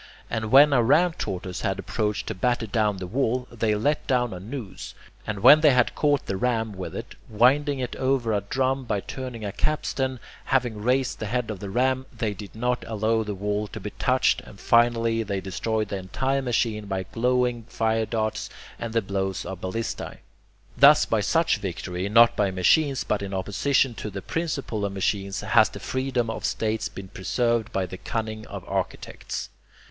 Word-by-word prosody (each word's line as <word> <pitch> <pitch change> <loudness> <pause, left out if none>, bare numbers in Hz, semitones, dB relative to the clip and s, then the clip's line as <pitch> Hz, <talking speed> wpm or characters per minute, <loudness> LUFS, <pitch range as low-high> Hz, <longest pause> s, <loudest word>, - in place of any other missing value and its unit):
And 110 -2 -2
when 145 +2 +8
a 125 - +5
ram 160 +9 +4
tortoise 95 - -4
had - - -1
approached 105 -1 -2
to - - -3
batter 120 +5 0
down 105 -2 0
the 95 - -5
wall, 125 +4 -1
they 110 -2 0
let 145 +8 0
down 125 -4 +1
a 90 - -6
noose, 110 +1 -7 0.3
and 105 -2 -3
when 145 +7 +8
they 155 - +7
had 125 -1 +3
caught 145 -2 +1
the 95 - -2
ram 115 0 0
with 95 -1 -6
it, - - -6 0.2
winding 135 +6 +3
it 125 -2 -4
over 130 -4 +1
a 100 - +1
drum 130 +5 -1
by 105 -4 -1
turning 125 -3 -6
a 100 - -3
capstan, 130 -2 -1 0.3
having 120 -5 0
raised 130 +3 +1
the 110 - -3
head 120 0 -1
of 100 - -6
the 100 - -6
ram, 130 +4 +1
they 115 -3 -2
did 100 +1 -10
not 125 +2 -1
allow 110 +1 +1
the 105 -2 -4
wall 105 +2 -2
to - - -8
be - - -6
touched, - - +2
and - - -14
finally 115 -1 +3
they 100 -3 -2
destroyed 110 +3 -2
the 100 - -2
entire 130 +9 -1
machine 115 -4 -1
by 95 -1 -2
glowing 120 +2 0
fire 110 -1 0
darts 110 -2 -2 0.3
and 115 -1 -4
the 115 -2 +1
blows 95 -1 -2
of 90 0 -6
ballistae. 110 +5 -4 0.6
Thus - - +7
by - - +1
such - - +2
victory, 90 +2 -4
not 115 +2 +6
by 100 -2 +2
machines 135 - +2
but 105 - -1
in 100 -1 -4
opposition 120 +7 +1
to 105 - -4
the 100 -1 -7
principle 145 -10 -3
of 100 -1 -2
machines, 100 0 -1
has - - +4
the - - -9
freedom 130 -2 -1
of - - -6
states 110 0 -1
been 95 -1 -9
preserved 115 +5 0
by 95 -1 0
the 95 - -8
cunning 110 -1 -4
of 100 -2 -8
architects. 95 -1 -4
115 Hz, 190 wpm, -25 LUFS, 100-125 Hz, 0.6 s, when